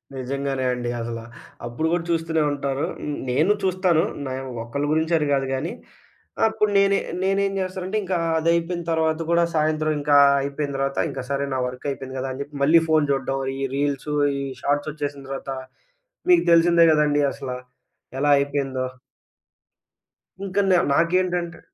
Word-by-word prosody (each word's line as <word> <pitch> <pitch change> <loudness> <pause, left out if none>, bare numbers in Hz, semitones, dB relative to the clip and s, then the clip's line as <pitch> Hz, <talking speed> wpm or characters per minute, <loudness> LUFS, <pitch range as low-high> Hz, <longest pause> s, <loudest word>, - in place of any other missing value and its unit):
నిజంగానే 135 0 -2
అండి 120 -1 -3
అసల. 115 0 -4 0.5
అప్పుడు 120 +7 -2
గూడా 175 -1 0
చూస్తూనే 165 -1 +1
ఉంటారు. 140 -1 -2
హ్మ్, 150 -1 -4
నేను 155 +10 +3
చూస్తాను. 185 -3 +2 0.2
న్యావ్ 130 0 -5
ఒక్కళ్ళ 140 +5 -3
గురించి 160 +2 +1
అని 150 - 0
కాదు 135 -1 +1
గానీ, 145 +6 -2 0.8
అప్పుడు 215 -1 0
నేనే 200 0 +4 0.2
నేనేం 195 +1 +1
జేస్తానంటే, 185 +2 -3
ఇంకా 185 -1 -1 0.2
అదయిపోయిన 170 +1 0
తర్వాత 160 0 +1
గూడా, 170 0 +4
సాయంత్రం 155 0 +1
ఇంకా 145 0 +3 0.2
అయిపోయిన 140 0 -3
తర్వాత 135 0 -1
ఇంక - - -6
సరే 140 0 0
నా 130 - -1
వర్కయిపోయింది 130 +1 -5
గదా 135 0 -3
అని 135 - -6
చెప్పి, 145 +1 -16
మళ్ళీ 165 +3 +6
ఫోను 155 -2 +3
చూడ్డం, 135 0 -1 0.2
ఈ - - -2
రీల్సు, 145 +1 -1 0.3
ఈ - - -3 0.2
షార్ట్సొచ్చేసిన 145 -1 -2
తర్వాత 135 0 -5 0.8
మీకు 350 -1 +5
తెలిసిందే 170 0 +6
గదండీ 150 -1 +3
అసల! 130 -2 -6 0.7
ఎలా 145 0 +3
అయిపోయిందో. 135 -2 -1 1.6
ఇంక 195 +1 -6
నె 180 - +5
నాకేంటంటే 170 +2 +1
150 Hz, 145 wpm, -23 LUFS, 135-170 Hz, 1.6 s, మళ్ళీ